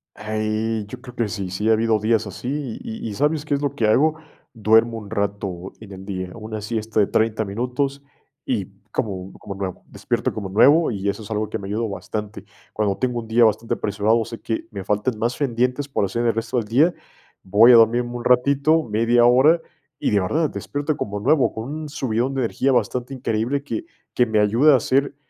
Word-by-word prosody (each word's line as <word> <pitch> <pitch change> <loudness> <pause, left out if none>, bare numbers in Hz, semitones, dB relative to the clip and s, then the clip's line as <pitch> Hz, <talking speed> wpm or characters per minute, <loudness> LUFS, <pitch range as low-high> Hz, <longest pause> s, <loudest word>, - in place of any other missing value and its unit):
Ahí, 110 0 -2
yo 125 +4 -9
creo 125 -2 -12
que 115 -3 0
sí, 100 -3 -4
sí 105 +4 -1
ha - - +6
habido 110 0 +2
días 110 +1 +1
así 130 +4 -4
y 110 +1 -6
y 105 - -5
¿sabes 150 +5 0
qué 150 - -1
es 140 - 0
lo 140 -1 -2
que 115 -6 +1
hago? 150 +8 +3 0.4
Duermo 115 +1 +3
un 105 -2 -9
rato 100 -3 -3
en 110 -2 -12
el 95 0 -9
día, 95 -2 -4
hago 90 - -11
una 110 0 -6
siesta 110 0 -2
de 100 - +4
30 110 0 +1
minutos, 125 +7 -2 0.4
y - - -1 0.3
como 95 -3 -3
como - - -8
nuevo, 95 -2 -5
despierto - - -2
como 100 -3 -5
nuevo, 145 - +5
y 100 -2 -3
eso 105 +3 -3
es 105 - -10
algo 110 0 -1
que 110 - -4
me 95 - -7
ha - - -7
ayudado 110 +2 -1
bastante. 105 +1 -6 0.3
Cuando 105 -2 0
tengo 125 -2 -1
un 115 - -8
día 115 +1 +4
bastante 110 +1 +1
apresurado, 110 +3 +1
sé 115 0 -9
que 110 - -3
me 100 -3 -6
faltan 105 +4 -1
más 120 +2 -1
pendientes 125 +1 0
por 135 - -1
hacer 120 +5 -2
el 115 - +3
resto 115 +2 -2
del 115 - 0
día, 145 +11 +3 0.5
voy 105 +6 +6
a - - +9
dormirme 120 +2 +4
un 120 -1 -6
ratito, 140 +5 +3
media 115 +1 +3
hora, 135 +8 +5 0.4
y - - 0
de 105 - +3
verdad, 150 - 0
despierto 145 +1 -3
como 105 0 -3
nuevo, 135 +5 +2
con 110 0 -5
un 155 +1 -5
subidón 130 -2 -1
de 135 - -1
energía 130 +3 0
bastante 125 0 0
increíble 125 +2 -1
que 325 - -4 0.3
que 125 - +4
me 110 -2 +1
ayuda 115 +9 +5
a - - +6
hacer 135 +4 0
115 Hz, 215 wpm, -22 LUFS, 105-130 Hz, 0.5 s, a